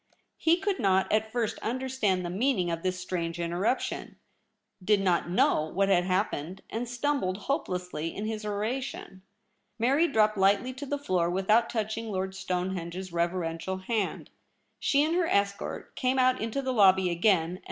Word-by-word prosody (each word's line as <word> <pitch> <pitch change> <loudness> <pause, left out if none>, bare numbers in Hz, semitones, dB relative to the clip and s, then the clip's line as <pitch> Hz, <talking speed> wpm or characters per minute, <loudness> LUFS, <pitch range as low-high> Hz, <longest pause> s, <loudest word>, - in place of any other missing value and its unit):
He 330 +1 +4
could 390 +1 -1
not 190 -1 +2
at 220 0 +1
first 235 -3 -1
understand 235 -7 -1
the 175 - -3
meaning 195 -4 +1
of 165 0 -3
this 185 0 -2
strange 175 -2 -3
Interruption; 175 +9 -2 0.7
did 210 +2 +3
not 180 -3 +1
know 165 -3 +3
what 195 +5 0
had 180 -2 +3
happened, 185 -2 -2
and 230 +1 -3
stumbled 245 -7 -1
hopelessly 180 - -2
in 210 - -4
his 215 0 -3
oration. 210 -1 -4 0.6
Mary 275 +9 +3
dropped 215 -6 +2
lightly 200 +7 +3
to 275 +3 -7
the 285 - -1
floor 185 -11 0
without 195 +6 +2
touching 220 0 -3
Lord 190 0 -2
Stonehenge's 180 -1 -4
reverential 170 +1 -1
hand. 205 +1 -3 0.5
She 280 +1 +3
and 315 +2 0
her 350 -1 +2
escort 200 -4 -1
came 255 0 0
out 255 0 +3
into 230 +5 -2
the 260 -1 -1
lobby 190 -4 +5
again, 170 -1 +3
and 180 - -6
]\Ir. - - -18
200 Hz, 165 wpm, -28 LUFS, 180-245 Hz, 0.7 s, lobby